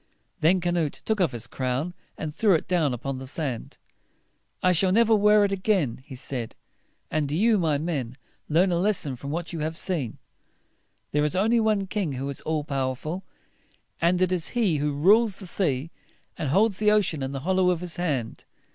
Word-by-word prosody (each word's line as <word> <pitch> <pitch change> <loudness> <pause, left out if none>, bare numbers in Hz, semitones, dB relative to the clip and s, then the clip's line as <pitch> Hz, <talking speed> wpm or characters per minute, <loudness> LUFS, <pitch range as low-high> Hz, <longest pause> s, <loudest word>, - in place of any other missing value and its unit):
Then 180 +4 +4
Canute 170 -4 -1
took 220 -3 0
off 170 -6 +2
his 120 -1 -4
crown, 130 +6 -2 0.2
and 155 -1 -4
threw 200 +1 +3
it 160 - -2
down 165 -6 +2
upon 130 +2 -4
the 130 - -7
sand. 135 -4 -4 0.9
"I 185 - +5
shall 185 +2 +3
never 225 +2 +4
wear 210 0 +5
it 200 - -1
again," 185 - 0
he 135 - -10
said. 125 -2 -5 0.6
"And 155 -2 0
do 150 - -1
you, 220 +1 +4
my 155 -4 +1
men, 140 -6 -3 0.3
learn 175 +5 +3
a 170 - +1
lesson 180 -8 0
from 140 +3 -8
what 170 +3 -4
you 165 - -4
have 160 +1 -2
seen. 155 - -1 0.9
There 150 0 +2
is 150 +2 0
only 225 +5 +3
one 215 -3 +1
King 190 -6 -2
who 135 +2 -4
is 140 - -5
all 155 -1 -1
powerful; 140 +5 -3 0.8
and 175 +2 +3
it 185 - +1
is 180 -3 -1
he 200 -10 +2
who 145 +1 0
rules 200 +9 +4
the 195 - -7
sea, 165 -5 0 0.4
and 150 - -3
holds 200 +5 +3
the 210 0 +4
ocean 205 -8 +2
in 135 0 -3
the 135 -1 -5
hollow 185 +3 +2
of 175 -2 0
his 180 -1 -4
hand. 140 -10 -2
165 Hz, 195 wpm, -26 LUFS, 140-190 Hz, 0.9 s, I